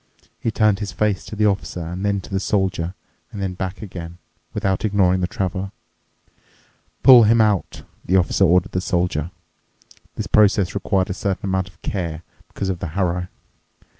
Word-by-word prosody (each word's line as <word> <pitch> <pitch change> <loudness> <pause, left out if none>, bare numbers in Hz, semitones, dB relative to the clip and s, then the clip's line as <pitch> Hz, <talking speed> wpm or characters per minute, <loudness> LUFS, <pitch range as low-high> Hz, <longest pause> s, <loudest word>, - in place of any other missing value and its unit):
He - - -1
turned 105 -2 +2
his 105 -2 -4
face 105 -3 0
to - - -7
the 105 0 +2
Officer 95 -4 -1
and 90 +3 -5
then 100 -1 0
to - - -13
the 95 - 0
Soldier 95 -3 -1 0.4
and 105 - -7
then 95 -2 -2
back 95 +2 -5
again, 85 -4 -8 0.3
without 95 -1 -1
ignoring 95 -3 +2
the 90 - +1
Traveler. 95 +1 -3 1.3
"Pull 125 -4 +9
him 115 +2 +4
out," 105 -4 +1 0.2
the 90 - 0
Officer 95 +1 +2
ordered 90 +1 +3
the 90 - -1
Soldier. 90 -4 -1 0.9
This - - -3
process 100 -4 +3
required 95 -2 0
a - - -1
certain 100 +1 -2
amount 95 -1 -1
of 90 -1 -24
care 85 -4 -3 0.2
because 95 - -4
of 90 -2 -2
the - - -4
harrow. 90 -1 0
95 Hz, 170 wpm, -21 LUFS, 90-100 Hz, 1.3 s, Pull